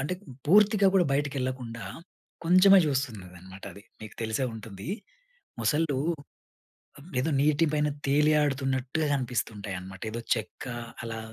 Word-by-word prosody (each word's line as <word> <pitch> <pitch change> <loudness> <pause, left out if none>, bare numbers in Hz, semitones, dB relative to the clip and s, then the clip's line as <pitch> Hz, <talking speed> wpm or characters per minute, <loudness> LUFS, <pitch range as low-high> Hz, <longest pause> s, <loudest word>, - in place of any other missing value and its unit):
అంటే 145 +7 -2 0.3
పూర్తిగా 205 +3 +5
కూడా 185 -2 +5
బయటికెళ్లకుండా 130 -4 -2 0.6
కొంచెమే 185 +3 +7
చూస్తుందనమాటది. 100 - -5 0.2
మీకు 110 -1 -9
తెలిసే 110 +4 -1
ఉంటుంది. 105 - -8 0.7
మొసళ్ళు 150 -3 +1 1.2
ఏదో 150 +6 0
నీటి 150 +2 +3
పైన 150 0 +2 0.2
తేలి 150 +2 +4
ఆడుతున్నట్టుగా 135 +1 0
కనిపిస్తుంటాయన్నమాట. 105 -7 -4
ఏదో 115 - -4 0.2
చెక్క 110 -2 -6 0.4
అలా 115 -1 -5
130 Hz, 100 wpm, -28 LUFS, 110-150 Hz, 1.2 s, కొంచెమే